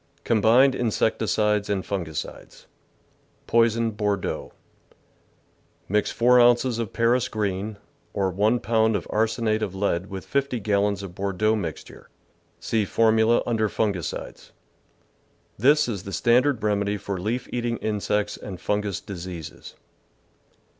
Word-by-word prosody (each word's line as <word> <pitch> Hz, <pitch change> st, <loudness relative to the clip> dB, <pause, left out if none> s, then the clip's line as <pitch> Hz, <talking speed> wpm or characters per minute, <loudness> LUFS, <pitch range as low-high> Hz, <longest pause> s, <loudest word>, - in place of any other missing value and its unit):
Combined 115 Hz, +4 st, +4 dB
Insecticides 105 Hz, -3 st, 0 dB
and 100 Hz, -2 st, -1 dB
Fungicides 85 Hz, -6 st, -6 dB, 0.8 s
Poisoned 115 Hz, -1 st, +2 dB
Bordeaux. 105 Hz, -2 st, -2 dB, 0.7 s
— -, -, -39 dB
Mix 105 Hz, 0 st, +2 dB
4 125 Hz, +1 st, +4 dB
ounces 120 Hz, 0 st, +4 dB
of 115 Hz, -4 st, -3 dB
Paris 120 Hz, +2 st, +2 dB
green, 105 Hz, -1 st, -3 dB, 0.3 s
or 95 Hz, -2 st, -1 dB
1 105 Hz, +6 st, +1 dB
pound 110 Hz, -1 st, +2 dB
of -, -, -2 dB
arsenate 110 Hz, 0 st, 0 dB
of 95 Hz, -3 st, -3 dB
lead 95 Hz, -2 st, -1 dB
with 95 Hz, -2 st, -7 dB
50 140 Hz, -3 st, -1 dB
gal 100 Hz, -1 st, +1 dB
lons 100 Hz, -1 st, -1 dB
of 95 Hz, -3 st, -8 dB
Bordeaux 100 Hz, +3 st, 0 dB
mixture 85 Hz, -8 st, -7 dB, 0.5 s
(see 110 Hz, -2 st, 0 dB
formula 110 Hz, +2 st, +3 dB
under 110 Hz, -3 st, 0 dB
Fungicides). 100 Hz, -7 st, -3 dB, 1.1 s
This 145 Hz, +6 st, +4 dB
is 105 Hz, -6 st, -3 dB
the 100 Hz, +2 st, -8 dB
standard 125 Hz, +2 st, +2 dB
remedy 105 Hz, -1 st, 0 dB
for 100 Hz, -1 st, -5 dB
leaf 115 Hz, +6 st, -2 dB
eating 120 Hz, -1 st, -1 dB
insects 105 Hz, -1 st, -1 dB
and 95 Hz, -3 st, -8 dB
fungous 105 Hz, -2 st, -1 dB
diseases. 85 Hz, -5 st, -8 dB
105 Hz, 125 wpm, -24 LUFS, 100-115 Hz, 1.1 s, Combined